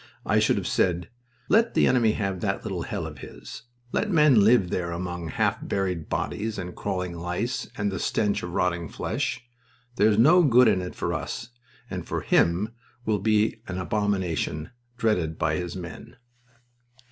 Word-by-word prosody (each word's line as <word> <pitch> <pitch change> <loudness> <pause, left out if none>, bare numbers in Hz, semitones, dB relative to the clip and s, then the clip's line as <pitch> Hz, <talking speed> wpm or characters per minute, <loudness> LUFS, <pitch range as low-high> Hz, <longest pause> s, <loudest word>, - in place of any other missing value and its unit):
I - - +3
should - - +3
have - - -2
said: 90 -2 +1 0.4
"Let 230 +2 +3
the - - +5
enemy 115 -4 +3
have 95 -4 -2
that - - -2
little - - -3
hell - - -4
of - - -8
his. - - -10 0.3
Let 210 - 0
men 150 - +5
live 105 -4 +4
there 85 -1 -1
among 90 -1 -4
half 80 - 0
buried 90 -5 -2
bodies 110 +1 -2
and 90 -2 -6
crawling 90 -2 -3
lice, 90 +9 -3
and 100 -1 0
the 95 - -3
stench 105 -2 0
of 90 - -5
rotting 85 -2 0
flesh. - - -3 0.5
There 105 - +5
is 105 - +2
no 160 +11 +7
good 125 -5 +6
in 95 -4 +3
it 90 - -6
for 85 - -2
us, 115 +8 -4 0.4
and 90 -6 -5
for - - -3
him 90 +6 +2 0.4
will 110 -2 +1
be 110 +2 +1
an 90 - -4
abomination, 95 -5 -1 0.3
dreaded 90 -10 0
by 80 0 0
his 90 +1 -4
men." 85 -3 -8
95 Hz, 170 wpm, -26 LUFS, 90-110 Hz, 0.5 s, no